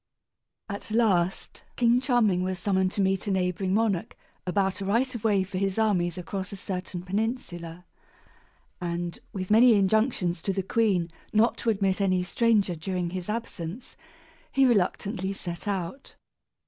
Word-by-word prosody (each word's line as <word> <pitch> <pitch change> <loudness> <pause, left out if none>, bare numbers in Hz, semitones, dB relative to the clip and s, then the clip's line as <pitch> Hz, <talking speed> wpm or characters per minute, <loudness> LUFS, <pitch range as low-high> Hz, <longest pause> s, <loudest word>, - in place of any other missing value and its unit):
At 200 0 -6
last 195 -5 +1
King 240 +1 +3
Charming 235 -8 +2
was 185 0 -2
summoned 190 0 +1
to 205 - 0
meet 195 +1 +1
a - - +1
neighboring 185 0 0
monarch 210 -5 0 0.3
about 190 +1 0
a - - -2
right 240 +6 +1
of 235 -3 -6
way 205 -4 +3
for 190 0 -4
his 195 0 -1
armies 185 -6 +1
across 190 +2 -5
a - - -5
certain 180 -2 -5
peninsula; 180 -4 -3 1.0
and, 170 0 -3
with 185 0 -4
many 230 +2 +7
injunctions 195 -3 +1
to 195 - -1
the 195 0 -1
queen 190 -5 +1 0.2
not 220 +2 +4
to 235 - -1
admit 195 -2 +1
any 185 -2 +2
stranger 210 -1 +2
during 175 +1 -3
his 185 +1 -5
absence, 215 -2 -5 0.6
he 270 0 +4
reluctantly 200 -3 +1
set 175 0 -6
out. 195 +6 -4
195 Hz, 150 wpm, -27 LUFS, 180-220 Hz, 1.0 s, many